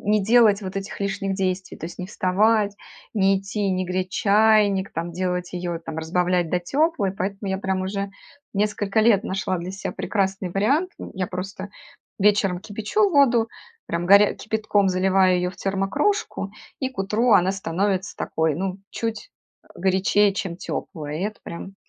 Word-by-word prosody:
не 210 -2 +3
делать 220 -2 +5
вот 185 0 -6
этих 195 +1 -5
лишних 195 -1 -2
действий, 185 -1 -2
то - - -5
есть: 175 - -10
не 180 - -4
вставать, 205 +2 +2 0.4
не 195 -2 +3
идти, 195 +1 -2
не 185 0 0
греть 185 +1 -2
чайник, 205 -1 +3
там 170 +1 -4
делать 180 0 -2
её, 175 -1 -3
там 160 -1 -7
разбавлять 175 +1 0
до 180 - +2
теплой. 270 - 0
Поэтому 195 +1 -4
я 190 0 -1
прям 190 -1 -1
уже 195 +1 -3 0.4
несколько 205 0 0
лет 215 -3 +4
нашла 190 -2 -2
для 175 +2 -5
себя 195 +1 -5
прекрасный 195 -2 -1
вариант. 275 - +1
М, - - -8
я 185 -1 -2
просто 190 +2 -6 0.5
вечером 200 -3 +3
кипячу 220 - 0
воду, 250 -7 +4 0.4
прям 170 +1 -2
горя 200 +2 +6
кипятком 215 -2 0
заливаю 185 0 +3
её 180 0 0
в - - -17
термокружку, 200 - -1 0.3
и 260 - 0
к 260 - -20
утру 215 +5 +1
она 190 -1 +5
становится 195 +1 -1
такой, 160 -1 0
ну, 190 +1 -3
чуть, 230 - -4 0.3
э, - - -26
горячее, 195 +2 +3
чем 185 -4 -3
тёплая. 150 -4 -5
И - - -3
это 215 0 -4
прям 190 +3 -8
195 Hz, 165 wpm, -23 LUFS, 185-210 Hz, 0.5 s, горя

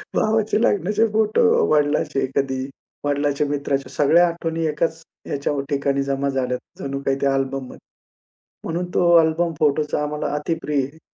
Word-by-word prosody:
भावाचे 220 0 +1
लग्नाचे 210 +1 +2
फोटो 215 - +2 0.3
वडिलांचे 145 -2 +1
कधी, 135 -1 0 0.5
वडिलांच्या 145 0 0
मित्राच्या 140 -2 -2
सगळ्या 165 +6 +4
आठवणी 165 -1 -3
एकाच 160 +2 -1 0.3
ह्याच्या 140 +1 -2 0.2
ठिकाणी 140 -1 0
जमा 140 0 -1
झाल्यात, 125 -2 -1 0.2
जणू 140 0 -4
काही 135 0 +1
त्या 140 -1 +2
अल्बममध्ये. 135 -1 -3 0.9
म्हणून 175 +2 -2
तो - - +3 0.2
अल्बम 165 +1 +1
फोटोचा 150 0 +1
आम्हाला 150 -1 -3
अतिप्रिय 150 -2 -1
आहे. 140 +4 -11
150 Hz, 135 wpm, -22 LUFS, 140-165 Hz, 0.9 s, सगळ्या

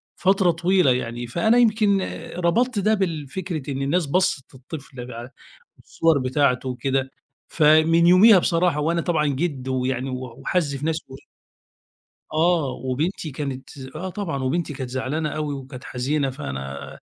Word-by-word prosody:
فترة 190 -2 +3
طويلة 175 -3 +3
يعني. 120 -1 -2
فأنا 220 - +2
يمكن 215 -4 +3 0.4
ربطت 210 +7 +1
ده 215 +3 +2
بالفكرة 165 -4 -3
إن 135 0 -3
الناس 155 +4 +1
بصّت 165 -4 0
للطفل 130 -2 -9
ع 120 +1 -7 0.6
الصور 165 -3 +2
بتاعته 130 -1 +1
وكده، 135 +1 -1 0.4
فمن 160 +2 +4
يوميها 190 +2 +8
بصراحة 170 -2 +1
وأنا 165 +3 +1
طبعًا 155 -4 +1
جِد 140 -2 -2
ويعني 130 0 -1
و 130 - -3 0.2
وحزّ 155 -6 -1
في 140 +3 -5
نفسي 160 0 -2 1.3
آه، 160 -3 +2
وبنتي 150 +7 -3
كانت 135 0 -6 0.2
آه، 185 +4 -4
طبعًا. 170 -8 -4
وبنتي 155 +4 -1
كانت 130 -2 -6
زعلانة 140 +4 -2
أوي 150 -2 -3
وكانت 130 -1 -9
حزينة، 135 +2 -1
فأنا 70 - -7
150 Hz, 135 wpm, -23 LUFS, 130-175 Hz, 1.3 s, يوميها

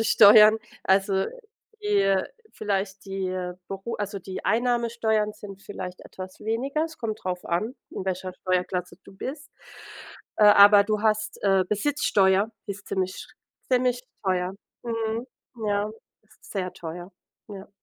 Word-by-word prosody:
welche 225 - +1
Steuern. 215 +1 +8 0.3
Also, 195 +1 +3
äh, - - -3 0.5
die, - - -5
äh, 195 - +2 0.3
vielleicht 200 -1 -3
die, 195 -1 -3
äh, 180 -1 -3
Beru 195 +4 -5
also 205 -1 -4
die 185 0 -7
Einnahmesteuern 230 -3 +1
sind 195 -1 -11
vielleicht 185 -3 -7
etwas 185 0 -10
weniger. 270 +8 -1
Es 320 -1 -9
kommt 220 -2 -3
drauf 180 -1 -3
an, 215 +9 -1 0.2
in 190 - -5
welcher 185 0 -3
Steuerklasse 180 -1 -2
du - - -14
bist. 280 +8 -6 0.9
Äh, 210 - +5
aber 205 0 +8
du 215 0 -1
hast, 215 -1 0
äh, 195 -2 +3
Besitzsteuer, 210 -4 +2 0.2
ist 200 0 -7
ziemlich 185 -1 -1
schr - - -11 0.4
ziemlich 250 -1 +2 0.2
teuer. 185 0 0 0.3
Mhm, 225 0 -2 0.4
ja, 205 0 0 0.4
s - - -23
sehr 185 -3 -2
teuer, 175 +2 -8 0.4
ja. 200 -1 -9
205 Hz, 145 wpm, -25 LUFS, 190-220 Hz, 0.9 s, Steuern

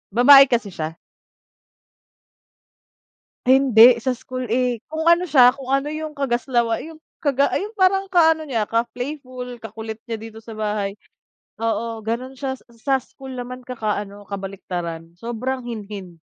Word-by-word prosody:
babae 275 +3 +9
kasi 235 -5 0
siya. 160 -1 -5 2.5
Hindi, 250 -2 +7
sa 255 +2 0
school, 255 -1 -6
eh, 245 -1 0
kung 315 +1 -3
ano 345 +1 +4
siya 250 -4 +7
kung 270 -1 -10
ano 275 +1 +1
yung 310 0 -5
kagaslawa 240 -3 0
'yung 320 0 -10 0.2
kaga 280 -2 +2
yung 420 +3 -5
parang 385 +1 +3
ka-ano 320 -3 +4
niya 230 -6 0
ka 230 +1 +1
playful, 255 -2 -6
kakulit 220 0 -7
niya 230 -1 -3
dito 225 0 -10
sa 225 0 -10
bahay, 210 -2 -2 0.7
oo, 230 0 -1
ganon 250 +4 -3
siya 270 0 -3 0.2
sa 265 +4 0
school 265 +1 -11
naman 250 +1 -6
kaka-ano 210 -4 -4
kabaliktaran 175 -4 -5
sobrang 250 +3 -3
hinhin. 210 -5 -7
245 Hz, 135 wpm, -22 LUFS, 220-275 Hz, 2.5 s, babae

